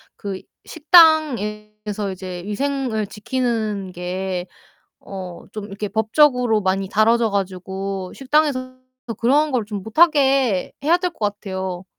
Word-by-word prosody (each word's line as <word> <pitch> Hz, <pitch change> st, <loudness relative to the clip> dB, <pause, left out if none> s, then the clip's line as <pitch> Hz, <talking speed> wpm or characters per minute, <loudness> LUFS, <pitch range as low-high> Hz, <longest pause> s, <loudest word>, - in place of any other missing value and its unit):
그 195 Hz, -2 st, -6 dB, 0.2 s
식당에서 210 Hz, -, +3 dB
이제 185 Hz, -1 st, -7 dB
위생을 245 Hz, -1 st, -2 dB
지키는 215 Hz, -3 st, -2 dB
게 180 Hz, +1 st, -4 dB, 0.5 s
어 185 Hz, -3 st, -8 dB
좀 210 Hz, -1 st, -6 dB
이렇게 205 Hz, 0 st, -5 dB
법적으로 225 Hz, +1 st, +2 dB
많이 190 Hz, 0 st, 0 dB
다뤄져 225 Hz, +2 st, +3 dB
가지고 190 Hz, 0 st, -4 dB
식당에서 270 Hz, -2 st, 0 dB, 0.4 s
그런 290 Hz, +5 st, +2 dB
걸 240 Hz, -4 st, 0 dB
좀 205 Hz, -3 st, -5 dB
못 220 Hz, +7 st, -10 dB
하게 275 Hz, -, +3 dB
해야 330 Hz, +4 st, +4 dB
될 360 Hz, 0 st, -2 dB
것 -, -, -29 dB
같아요. 190 Hz, -2 st, -5 dB
210 Hz, 245 characters per minute, -21 LUFS, 195-260 Hz, 0.5 s, 해야